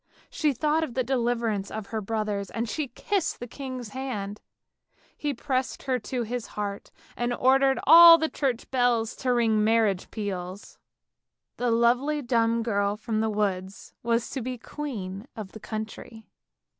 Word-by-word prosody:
She 305 Hz, -2 st, +1 dB
thought 300 Hz, +5 st, +1 dB
of 270 Hz, -7 st, -5 dB
the 260 Hz, -, +1 dB
deliverance 235 Hz, -5 st, 0 dB
of 220 Hz, -1 st, -5 dB
her 220 Hz, -, -1 dB
brothers, 210 Hz, -2 st, -2 dB
and 230 Hz, +5 st, -3 dB
she 295 Hz, +6 st, -2 dB
kissed 390 Hz, -, -2 dB
the 245 Hz, -, -5 dB
king's 255 Hz, -2 st, -7 dB
hand; 210 Hz, -6 st, -5 dB, 0.7 s
he 295 Hz, -, -2 dB
pressed 260 Hz, 0 st, -2 dB
her 260 Hz, -2 st, 0 dB
to 245 Hz, +2 st, -3 dB
his 240 Hz, +1 st, -4 dB
heart, 205 Hz, -1 st, -4 dB, 0.3 s
and 240 Hz, 0 st, -1 dB
ordered 265 Hz, +2 st, +3 dB
all 335 Hz, 0 st, +10 dB
the 320 Hz, 0 st, 0 dB
church 260 Hz, -6 st, -2 dB
bells 245 Hz, -3 st, +1 dB
to 255 Hz, -, 0 dB
ring 225 Hz, -3 st, +3 dB
marriage 215 Hz, -4 st, +2 dB
peals. 195 Hz, -2 st, -6 dB, 0.8 s
The 245 Hz, 0 st, 0 dB
lovely 250 Hz, +6 st, +2 dB
dumb 230 Hz, -1 st, +2 dB
girl 200 Hz, -2 st, 0 dB
from 215 Hz, 0 st, -2 dB
the 220 Hz, -, +1 dB
woods 195 Hz, -2 st, -2 dB
was 235 Hz, 0 st, 0 dB
to 265 Hz, -, -3 dB
be 250 Hz, +1 st, -4 dB
queen 225 Hz, -6 st, -6 dB
of 210 Hz, -4 st, -7 dB
the 220 Hz, -, -10 dB
country. 220 Hz, +1 st, -7 dB
235 Hz, 155 wpm, -26 LUFS, 215-260 Hz, 0.8 s, all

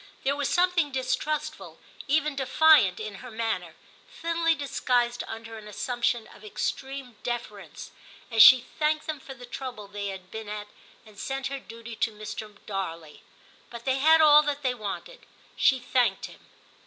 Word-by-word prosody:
There 280 Hz, +1 st, +1 dB
was 285 Hz, -1 st, -1 dB
something 355 Hz, -4 st, +2 dB
distrustful, 305 Hz, +3 st, -3 dB, 0.3 s
even 300 Hz, 0 st, +1 dB
defiant, 275 Hz, -, +5 dB
in 215 Hz, -2 st, -6 dB
her 250 Hz, -, -9 dB
manner, 220 Hz, -7 st, -3 dB, 0.4 s
thinly 335 Hz, -6 st, 0 dB
disguised 245 Hz, -4 st, 0 dB
under 225 Hz, 0 st, -8 dB
an 210 Hz, -, -12 dB
assumption 240 Hz, +1 st, -1 dB
of -, -, -16 dB
extreme 265 Hz, +3 st, -4 dB
deference, 235 Hz, -5 st, -6 dB, 0.4 s
as 225 Hz, -1 st, +5 dB
she 255 Hz, +1 st, +9 dB
* -, -, -23 dB
thanked 305 Hz, 0 st, +1 dB
them 310 Hz, -2 st, -4 dB
for 270 Hz, 0 st, -10 dB
the 245 Hz, 0 st, -11 dB
trouble 245 Hz, -4 st, -7 dB
they 205 Hz, 0 st, -5 dB
had 190 Hz, -1 st, -8 dB
been 220 Hz, -1 st, -7 dB
at, 210 Hz, 0 st, -6 dB, 0.4 s
and 210 Hz, -2 st, -15 dB
sent 270 Hz, 0 st, -3 dB
her 275 Hz, -, -3 dB
duty 230 Hz, +2 st, -10 dB
to 225 Hz, -, 0 dB
Mr. 210 Hz, 0 st, -8 dB
Darley; 165 Hz, -6 st, -5 dB, 0.5 s
but 235 Hz, 0 st, -10 dB
they 265 Hz, 0 st, +1 dB
had 320 Hz, +3 st, +6 dB
all 300 Hz, -1 st, +8 dB
that 290 Hz, -1 st, -3 dB
they 255 Hz, -2 st, +1 dB
wanted, 245 Hz, -, -7 dB, 0.3 s
she 265 Hz, -, +4 dB
thanked 245 Hz, -5 st, +1 dB
him. -, -, -14 dB
245 Hz, 165 wpm, -27 LUFS, 215-285 Hz, 0.5 s, she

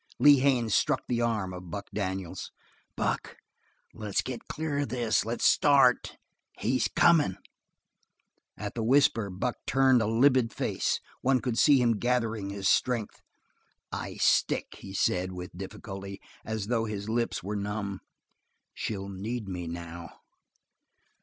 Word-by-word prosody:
Lee 145 Hz, -2 st, +7 dB
Haines 125 Hz, -5 st, +2 dB
struck -, -, +2 dB
the 120 Hz, -1 st, 0 dB
arm 110 Hz, -6 st, -1 dB
of 90 Hz, -1 st, -9 dB
Buck 100 Hz, +1 st, -5 dB
Daniels. 95 Hz, -3 st, -4 dB, 0.5 s
"Buck, -, -, -2 dB, 0.6 s
let's 105 Hz, -3 st, -2 dB
get 125 Hz, -3 st, -6 dB
clear 155 Hz, -2 st, -2 dB
of 145 Hz, -, -1 dB
this. 120 Hz, -3 st, +1 dB
Let's 115 Hz, +1 st, -2 dB
start. 140 Hz, -4 st, +4 dB, 0.4 s
He's 130 Hz, +4 st, +1 dB
coming." 160 Hz, -, +3 dB, 1.2 s
At 105 Hz, 0 st, -5 dB
the 115 Hz, -, -3 dB
whisper 120 Hz, -4 st, +3 dB
Buck 100 Hz, +7 st, -3 dB
turned 130 Hz, -2 st, +4 dB
a 110 Hz, -, 0 dB
livid 125 Hz, +1 st, +3 dB
face; -, -, -1 dB, 0.2 s
one 130 Hz, 0 st, +3 dB
could 125 Hz, -2 st, -2 dB
see 145 Hz, -3 st, +6 dB
him 115 Hz, -4 st, +2 dB
gather 120 Hz, -2 st, +1 dB
his 100 Hz, -2 st, -3 dB
strength. 120 Hz, -2 st, +1 dB, 0.7 s
"I -, -, -5 dB
stick," -, -, +1 dB
he 95 Hz, 0 st, -9 dB
said 90 Hz, 0 st, 0 dB
with 90 Hz, -1 st, -8 dB
difficulty, 95 Hz, +1 st, -7 dB, 0.2 s
as 110 Hz, -2 st, -3 dB
though 115 Hz, 0 st, 0 dB
his 105 Hz, -2 st, -5 dB
lips 115 Hz, -3 st, -1 dB
were 105 Hz, +3 st, -3 dB
numb. 100 Hz, -1 st, -3 dB, 0.7 s
"She'll 100 Hz, -3 st, -4 dB
need 105 Hz, +3 st, -5 dB
me 90 Hz, -2 st, -5 dB
now." 85 Hz, 0 st, -7 dB
110 Hz, 140 wpm, -28 LUFS, 100-125 Hz, 1.2 s, Lee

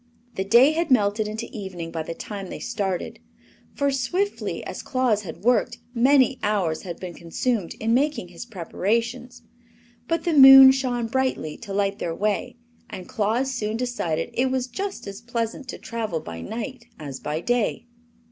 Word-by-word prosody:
The 190 Hz, -, -2 dB
day 235 Hz, +8 st, +6 dB
had 330 Hz, +1 st, -1 dB
melted 210 Hz, -3 st, +2 dB
into 220 Hz, +2 st, -5 dB
evening 185 Hz, -5 st, -6 dB
by 165 Hz, -1 st, -3 dB
the 165 Hz, +1 st, -6 dB
time 195 Hz, -1 st, -7 dB
they -, -, -6 dB
started; 195 Hz, -6 st, -3 dB, 0.6 s
for, 280 Hz, -1 st, +1 dB
swiftly 360 Hz, +10 st, -2 dB
as -, -, -6 dB
Claus 255 Hz, -6 st, +1 dB
had 180 Hz, -1 st, -9 dB
worked, 245 Hz, +1 st, +2 dB, 0.2 s
many 260 Hz, +1 st, +4 dB
hours 190 Hz, -7 st, 0 dB
had 175 Hz, -3 st, -7 dB
been 180 Hz, -2 st, -6 dB
consumed 180 Hz, +4 st, -2 dB
in 225 Hz, +1 st, 0 dB
making 275 Hz, -7 st, 0 dB
his 180 Hz, +7 st, -9 dB
preparations. 230 Hz, +5 st, -2 dB, 0.6 s
But 330 Hz, -, 0 dB
the 345 Hz, -, 0 dB
moon 270 Hz, -2 st, +11 dB
shone 255 Hz, -3 st, -1 dB
brightly 255 Hz, -10 st, -1 dB
to 215 Hz, -4 st, -9 dB
light 200 Hz, 0 st, 0 dB
their 165 Hz, -1 st, -3 dB
way, 215 Hz, +5 st, -1 dB, 0.3 s
and 185 Hz, -, -8 dB
Claus 235 Hz, +4 st, 0 dB
soon 220 Hz, -2 st, -2 dB
decided 240 Hz, -10 st, -2 dB
it 260 Hz, +2 st, +1 dB
was 260 Hz, -1 st, 0 dB
just 385 Hz, +11 st, -5 dB
as 200 Hz, +2 st, -8 dB
pleasant 235 Hz, +2 st, -3 dB
to -, -, -6 dB
travel 220 Hz, -8 st, -3 dB
by 85 Hz, -, -8 dB
night 240 Hz, -, -6 dB
as 140 Hz, -4 st, -7 dB
by 150 Hz, +1 st, -3 dB
day. 240 Hz, +4 st, 0 dB
230 Hz, 165 wpm, -24 LUFS, 195-255 Hz, 0.6 s, moon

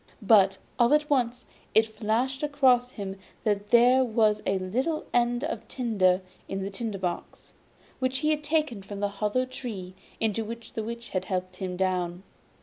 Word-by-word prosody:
But 195 Hz, -2 st, +5 dB, 0.2 s
all 240 Hz, +4 st, +6 dB
at 300 Hz, 0 st, 0 dB
once 245 Hz, -2 st, +1 dB, 0.3 s
it 220 Hz, -, +6 dB
flashed 225 Hz, +5 st, -1 dB
across 265 Hz, -4 st, +3 dB
him 200 Hz, -5 st, -6 dB, 0.3 s
that 205 Hz, -1 st, 0 dB
there 250 Hz, +3 st, +6 dB
was 215 Hz, -3 st, +2 dB
a 195 Hz, -, +2 dB
little 255 Hz, -, -1 dB
end 240 Hz, +1 st, +2 dB
of 265 Hz, -8 st, -4 dB
tinder 195 Hz, -7 st, +1 dB, 0.3 s
in 195 Hz, 0 st, -3 dB
the 195 Hz, -, -4 dB
tinder 215 Hz, 0 st, -4 dB
box, 180 Hz, -2 st, -5 dB, 0.5 s
which 260 Hz, 0 st, 0 dB
he 305 Hz, -, +4 dB
had 300 Hz, -1 st, -1 dB
taken 300 Hz, -8 st, 0 dB
from 200 Hz, +1 st, -8 dB
the 205 Hz, 0 st, 0 dB
hollow 215 Hz, +5 st, +1 dB
tree 220 Hz, -8 st, -7 dB, 0.3 s
into 225 Hz, 0 st, 0 dB
which 230 Hz, +1 st, -8 dB
the 220 Hz, -, -3 dB
Witch 235 Hz, +1 st, -6 dB
had 185 Hz, -1 st, -2 dB
helped 185 Hz, -1 st, -3 dB
him 180 Hz, -1 st, -4 dB
down. 180 Hz, -1 st, -1 dB
225 Hz, 170 wpm, -27 LUFS, 195-255 Hz, 0.5 s, all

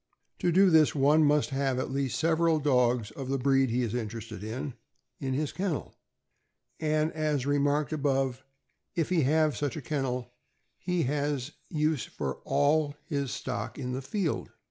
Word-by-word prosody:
To 175 Hz, -, +2 dB
do 190 Hz, +2 st, +5 dB
this, 155 Hz, -2 st, +5 dB
one 145 Hz, +3 st, +5 dB
must 150 Hz, 0 st, +3 dB
have 135 Hz, -1 st, 0 dB
at 130 Hz, -, -2 dB
least 135 Hz, -2 st, -1 dB
several 165 Hz, 0 st, +3 dB
dogs 125 Hz, -6 st, +2 dB
of 130 Hz, +2 st, -6 dB
the 135 Hz, -, +1 dB
breed 135 Hz, 0 st, +3 dB
he 125 Hz, +2 st, +1 dB
is 115 Hz, -2 st, -2 dB
interested 115 Hz, -3 st, -5 dB
in, 125 Hz, +5 st, -4 dB, 0.5 s
in 130 Hz, -1 st, -2 dB
his 150 Hz, +1 st, -1 dB
kennel, 185 Hz, -5 st, -3 dB, 0.9 s
and 155 Hz, 0 st, +1 dB
as 150 Hz, -4 st, -1 dB
remarked 145 Hz, +1 st, +1 dB
above, 135 Hz, -3 st, 0 dB, 0.5 s
if 165 Hz, -2 st, 0 dB
he 180 Hz, -3 st, +3 dB
have 155 Hz, +1 st, +3 dB
such 145 Hz, +3 st, -2 dB
a -, -, -4 dB
kennel 125 Hz, -4 st, -2 dB, 0.5 s
he 180 Hz, -2 st, 0 dB
has 145 Hz, 0 st, -1 dB, 0.2 s
use 155 Hz, -3 st, 0 dB
for 70 Hz, -2 st, -4 dB
all 145 Hz, +1 st, +2 dB
his 140 Hz, -3 st, -2 dB
stock 130 Hz, +1 st, -4 dB
in 125 Hz, -3 st, -4 dB
the 130 Hz, +1 st, -3 dB
field. 170 Hz, +4 st, -2 dB
140 Hz, 165 wpm, -29 LUFS, 130-155 Hz, 0.9 s, do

